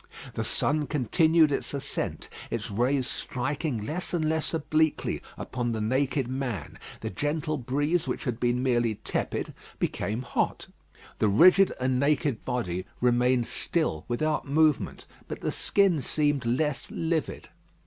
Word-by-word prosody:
The - - -2
sun 150 0 0
continued 155 +3 +3
its 140 - -2
ascent; 140 - -3 0.2
its - - -3
rays 125 +5 +1
striking 130 -2 -2
less 175 +7 -2
and 160 -2 0
less 160 0 0
obliquely 155 -1 0 0.2
upon 120 -2 -3
the 110 - -2
naked 130 +4 0
man. 125 - -4 0.2
The - - -4
gentle 150 - -1
breeze 145 +7 0
which - - -2
had 125 -5 -2
been 120 +1 +1
merely 120 -4 +2
tepid - - -3 0.2
became 110 +5 -2
hot. 120 - -1 0.5
The 110 - +3
rigid 185 - +6
and 130 0 +1
naked 140 -3 +1
body 95 -8 -2
remained 125 0 +3
still 155 - -1
without 150 +5 -1
movement; 155 0 +2 0.2
but - - -6
the - - -1
skin 195 -7 +2
seemed 145 -2 0
less 140 +4 0
livid. 165 -1 -2
135 Hz, 140 wpm, -27 LUFS, 120-155 Hz, 0.5 s, rigid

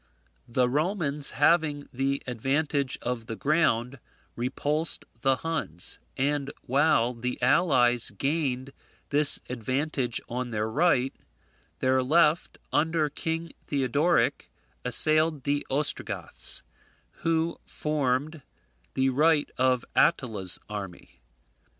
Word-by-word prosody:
The 125 +1 +2
Romans 150 0 +1
having 145 -1 +3
the 135 +2 -1
advantage 135 +3 0
of 120 -2 -3
the 115 - -4
ground, 140 -3 +1 0.4
repulsed 145 +6 -1 0.2
the 135 +1 +3
Huns, 130 - -4 0.2
and 140 +1 0
while 135 -3 +2
the 125 +1 -4
allies 125 -4 +3
gained 135 +2 -2 0.4
this 145 0 +3
advantage 130 +1 -1
on 125 +1 -3
their 110 -1 -1
right, 135 0 +2 0.7
their 130 0 +3
left, 155 +4 +2 0.2
under 160 -1 +1
King 165 +2 -3 0.2
Theodoric, 145 +5 +1 0.3
assailed 155 +3 +3
the 145 0 0
Ostrogoths, 145 +3 -1 0.5
who 165 0 0
formed 150 +1 -1 0.5
the 130 0 +2
right 150 +2 +3
of 130 -1 +2
Attila's 110 - +2
army. 95 -9 -8
140 Hz, 100 wpm, -27 LUFS, 125-155 Hz, 0.7 s, having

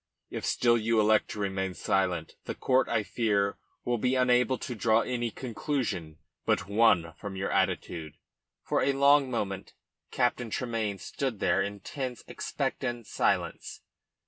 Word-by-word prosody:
If - - -4
still 120 -1 +3
you 115 0 +2
elect 110 0 +4
to - - -6
remain 95 -2 -2
silent, 90 -4 0
the - - -4
court, 130 0 +2
I 110 -2 +1
fear, 100 -3 0 0.3
will 120 -1 0
be 125 +3 +1
unable 125 0 +3
to 125 - -5
draw 110 0 +3
any 120 -1 -1
conclusion 115 - -3 0.3
but - - +1
one 100 -6 +3
from 100 -2 -6
your 95 +1 -2
attitude." 80 -3 -1 0.5
For - - +1
a 140 - +2
long 140 0 +5
moment 100 -5 -3 0.3
Captain 125 -1 0
Tremayne 110 -4 -2
stood 130 +1 -3
there - - +2
in 100 0 -4
tense, 130 0 -5
expectant 120 -3 -3
silence. - - -1
115 Hz, 145 wpm, -29 LUFS, 100-125 Hz, 0.5 s, long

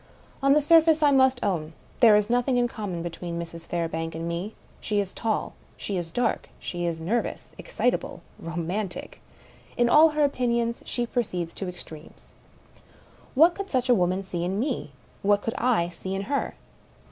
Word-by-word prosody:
On 275 0 +5
the 300 - +4
surface, 320 0 +5
I 290 - +6
must 260 -2 +4
own, 165 -6 -1 0.3
there 225 -4 +7
is 210 0 +3
nothing 245 +2 +1
in 245 0 +3
common 195 -8 -5
be 175 - -4
tween 170 0 -5
Mrs. 165 0 -8
Fairbank 165 -1 -3
and 165 +1 -4
me. 175 +6 -4 0.2
She 210 -1 -1
is 195 -2 -2
tall; 225 -2 -2 0.2
she 200 - -4
is 175 -2 -3
dark; 245 +4 -1
she 175 -1 -3
is 165 -1 -2
nervou^ 215 +9 -1 0.2
excitable, - - -1 0.2
romantic; 175 +4 -4 0.6
in 240 0 +3
all 310 +5 +7
her 300 -1 +1
opinions 235 -4 0
she 240 - -1
proceeds 180 -9 -2
to 190 - -4
extremes. 160 -3 -11 1.1
What 325 +6 +6
could 395 +1 -6
such 255 -1 0
a - - +7
woman 185 -2 +1
see 175 -2 -4
in 190 +3 -1
me? 250 - -2 0.3
what 205 0 +2
could 225 - -2
I 225 -8 +2
see 190 +2 -5
in 195 - -2
her? 280 +7 -2
205 Hz, 175 wpm, -26 LUFS, 175-245 Hz, 1.1 s, there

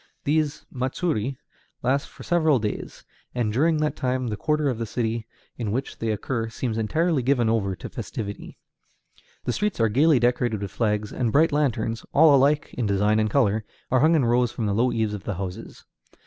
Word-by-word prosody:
These 150 0 0
matsuri 130 - -2 0.5
last 135 +3 +1
for - - -12
several 160 -5 +3
days, 105 -3 -4 0.3
and 115 -4 0
during 155 +6 +3
that 150 0 0
time 130 -1 -1
the 105 - -2
quarter 150 +5 0
of 125 -4 -1
the 115 - -3
city 115 0 -2 0.3
in 110 -4 -3
which 130 +5 -3
they 115 - -1
occur 115 +2 -2
seems 115 0 -3
entirely 155 +8 +1
given 125 -3 +2
over 100 -4 0
to - - -8
festivity. 100 -2 -6 0.9
The 125 - -1
streets 210 - -1
are 115 -1 +3
gayly 145 +6 +4
decorated 120 -2 +1
with 100 - -5
flags, 105 -2 -1
and 120 -3 0
bright 155 +6 +4
lanterns 115 -6 0
all 155 0 +7
alike 145 +2 +2
in 120 -4 -1
design 105 +2 +2
and 110 0 +1
color 110 -3 +2 0.3
are 130 - +4
hung 160 +4 +4
in 145 -6 +3
rows 120 0 +2
from 115 - -3
the 100 - 0
low 120 +4 +2
eaves 110 -2 -1
of 100 -2 -6
the 105 - -2
houses. 95 +4 -7
120 Hz, 190 wpm, -24 LUFS, 110-140 Hz, 0.9 s, all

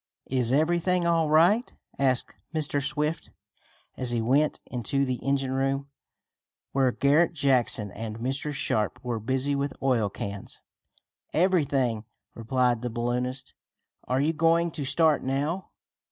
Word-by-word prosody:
"Is 125 -3 +1
everything 170 +4 +2
all 165 -2 +2
right?" 175 +10 +4 0.3
asked 130 -3 +1 0.2
Mr 145 -2 +2
Swift 150 +2 -2 0.7
as 125 - -3
he 120 -1 +1
went 135 +7 +2
into 130 +3 -1
the 130 -1 -2
engine 135 -1 0
room, 135 +1 -1 0.8
where 135 -2 +2
Garret 150 +7 +3
Jackson 130 - +1
and 110 +1 -6
Mr. 135 +5 -2
Sharp 110 -6 -1
were 120 -2 -2
busy 130 +5 -1
with 140 0 -1
oil 125 -6 +1
cans. 100 0 -7 0.7
"Everything," 140 - +1 0.3
replied 120 0 0
the 125 - -3
balloonist. 125 +2 -3 0.5
"Are 130 +1 +1
you 150 +4 +1
going 165 +1 +2
to 150 -3 -4
start 155 +1 +3
now?" 145 +8 -2
135 Hz, 130 wpm, -27 LUFS, 125-155 Hz, 0.8 s, right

